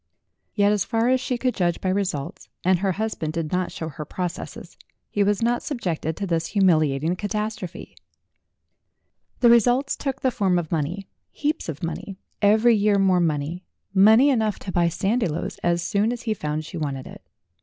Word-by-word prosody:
Yet, 205 -1 +4
as 210 -2 +1
far 230 +2 +1
as 260 0 +3
she 255 -1 -2
could 250 0 0
judge 175 -3 0
by 190 - -2
results 185 -7 -3
and 185 0 +3
her 190 0 0
husband 200 -7 -3
did 165 -2 -3
not 180 0 -1
show 160 - -5
her 150 0 -6
processes 180 +4 -6 0.4
he 205 - 0
was 205 +2 +1
not 240 +1 +1
subjected 170 - -3
to 200 - -2
this 165 -3 -1
humiliating 160 -5 +2
catastrophe. 205 - -4 1.5
The 235 - +7
results 245 +4 +3
took 270 -2 -4
the 260 - +2
form 195 -7 +1
of 170 -3 -3
money 170 +5 -2 0.2
heaps 300 - -2
of 160 +1 -6
money, 170 +4 -5 0.2
every 220 +3 +5
year 205 -1 +3
more 190 -2 +3
money 160 +1 -1 0.3
money 220 +8 +6
enough 220 -5 +1
to 190 - -5
buy 175 -1 +2
Sandiloes 190 -2 -1
as 170 0 +1
soon 205 +6 +1
as 245 -1 -5
he 225 -2 0
found 155 -4 -3
she 175 - -7
wanted 140 -4 -3
it. - - -11
195 Hz, 175 wpm, -24 LUFS, 170-220 Hz, 1.5 s, The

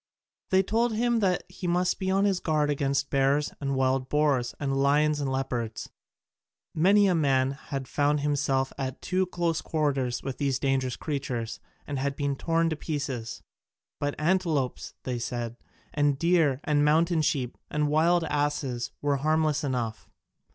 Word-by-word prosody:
They 190 0 +4
told 225 +4 +1
him 235 0 +1 0.3
he 180 0 -6
must 180 +1 +1
be 190 -1 -1
on 195 +1 +3
his 195 -3 +2
guard 150 -3 +1
against 140 -1 0
bears 140 +2 +2
and 140 -1 -1
wild 130 0 +1
boars 145 -5 +1
and 135 -1 -1
lions 145 +2 +3
and 135 -2 -1
leopards: 120 -4 -3 0.8
many 200 +6 +5
a 190 - +3
man 135 -5 +2
had 135 -1 -6
found 145 +1 +1
himself 135 -2 0
at 130 -1 -3
too 185 0 0
close 170 -3 -1
quarters 135 -6 -1
with 135 -1 -5
these 140 -2 +1
dangerous 135 -2 0
creatures, 130 -6 -4 0.3
and 140 -1 -2
been 140 -1 -1
torn 165 +3 +1
to - - 0
pieces: 140 -7 -4 0.6
but 145 0 -1
antelopes, 160 -5 0
they 125 -2 -3
said, 120 0 -4 0.4
and 145 -2 +2
deer 160 -5 +2
and 145 -1 +2
mountain 160 +2 +3
sheep 130 -5 -1
and 150 0 0
wild 165 +3 +3
asses 145 -5 -1
were 145 -1 +2
harmless 155 +1 +1
enough. 120 -5 -3
145 Hz, 150 wpm, -27 LUFS, 135-160 Hz, 0.8 s, many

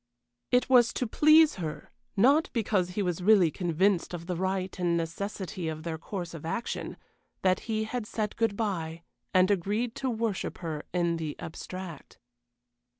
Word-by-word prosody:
It 250 0 +3
was 245 -3 +5
to 250 - -1
please 305 +5 +5
her, 160 -4 -5 0.3
not 275 +10 +5
because 205 -6 +1
he 205 - +2
was 180 -1 -1
really 190 -4 +5
convinced 180 +1 +1
of 170 -1 -8
the 180 0 -2
right 185 +1 -2
and 175 -1 +2
necessity 185 +2 -4
of 155 0 -4
their 165 -2 -4
course 175 -1 -5
of 165 - -8
action, 170 +9 -3 0.5
that 185 -1 +3
he 220 -1 +1
had 220 0 -4
said 215 -1 -2
good 225 -3 0
bye 170 -7 -2 0.3
and 185 +1 +4
agreed 210 +5 0
to 265 - -1
worship 225 -4 -2
her 160 -4 -5
in 170 -1 +1
the 155 -2 -4
abstract. 170 -1 -8
185 Hz, 160 wpm, -29 LUFS, 170-220 Hz, 0.5 s, was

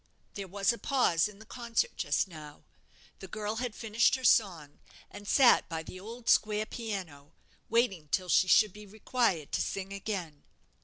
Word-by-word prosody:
There 200 -1 -6
was 200 +5 +1
a 235 - -9
pause 230 - +2
in 210 -1 -13
the 220 - -14
concert 235 - -2
just - - 0
now. 155 -4 -12 0.6
The 190 - -9
girl 215 +3 -4
had 245 -2 -3
finished 225 +2 +2
her 260 - -7
song, 175 - +2 0.3
and 205 - -11
sat 260 +1 +5
by 160 -1 -4
the 185 - -10
old 230 +4 -10
square 215 0 +3
piano, 185 -12 -7 0.4
waiting 210 -9 +1
till 185 +5 -1
she 185 +2 +4
should 210 +1 +5
be 210 0 -12
required 215 - -1
to - - 0
sing 195 0 -4
again. 185 -7 -5
205 Hz, 170 wpm, -30 LUFS, 180-230 Hz, 0.6 s, sat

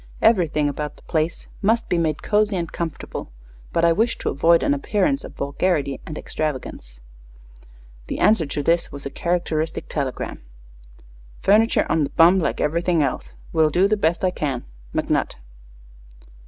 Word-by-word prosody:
Everything 165 -9 +3
about 150 +1 -4
the - - -21
place 160 +1 -1 0.2
must 225 +3 +2
be 175 - +1
made 155 -3 -1
cozy 210 -1 +2
and 170 -3 -3
comfortable, 165 - -5 0.4
but 170 - +2
I 170 - +5
wish 225 +7 +1
to - - -2
avoid 165 +4 +4
an - - +3
appearance 215 - 0
of - - -10
vulgarity 140 -1 -1
or 155 - -5
extravagance." 130 - -5 1.1
The - - -3
answer 195 -8 +3
to 145 +1 -3
this 165 +3 +1
was 140 0 -9
a 140 - -4
characteristic 165 -2 -2
telegram: 140 -4 -4 1.0
Furniture 215 +3 +4
on 160 - +2
the 140 - -1
bum, 175 +3 +5
like 170 - -1
everything 170 +1 +1
else. 135 - -3 0.2
Will 160 -2 +4
do 180 +5 +3
the 215 - +2
best 170 -3 +1
I 185 - +2
can. 140 -8 -3 0.3
McNutt. - - 0
165 Hz, 155 wpm, -22 LUFS, 150-185 Hz, 1.1 s, I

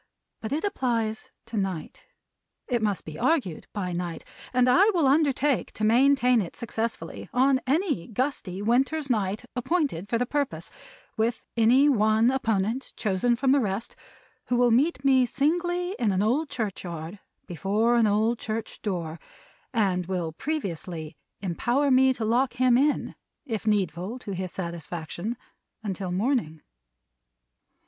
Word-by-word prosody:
But 220 - -5
it 300 +3 -1
applies 235 - -1 0.2
to 230 -1 -6
Night. 190 -6 -4 0.6
It 240 -3 0
must 205 -6 -1
be 155 -1 -8
argued 260 - 0
by 185 -4 -3
night. 175 -1 -4 0.3
And 250 0 +3
I 375 +12 +6
will 330 -4 +3
undertake 280 -1 +2
to 215 - -5
maintain 250 +1 +4
it 175 - -6
successfully 230 -1 -4
on 260 +1 +3
any 295 - 0
gusty 215 -6 -3
winter's 270 +5 +1
night 210 0 -1
appointed 250 - -1
for 230 - +1
the 245 - 0
purpose, 285 +1 -2 0.5
with 225 +2 0
any 240 +5 +5
one 220 -2 +4
opponent 225 -1 -1
chosen 215 +4 +1
from 260 +2 +2
the 280 - +5
rest, 210 -1 -3 0.5
who 250 - +1
will 245 0 +4
meet 270 +3 +2
me 260 -2 +5
singly 350 +7 0
in 225 -4 +2
an 190 +1 +1
old 280 +8 +1
churchyard, 180 -5 -5 0.3
before 205 +7 +1
an 230 -2 +4
old 220 +3 +1
church 220 +1 -5
door; 170 -5 -3 0.5
and 190 - +1
will 180 -4 -2
previously 170 - -4 0.3
empower 240 - +1
me 260 +1 +5
to 225 - -3
lock 245 +4 +2
him 250 0 +3
in, 285 +4 +1 0.3
if 225 -4 -4
needful 190 +1 0
to 230 -5 -7
his 185 -1 -4
satisfaction, 170 - -5 0.5
until 195 -3 -3
morning. 190 - -1
230 Hz, 140 wpm, -26 LUFS, 190-265 Hz, 0.6 s, I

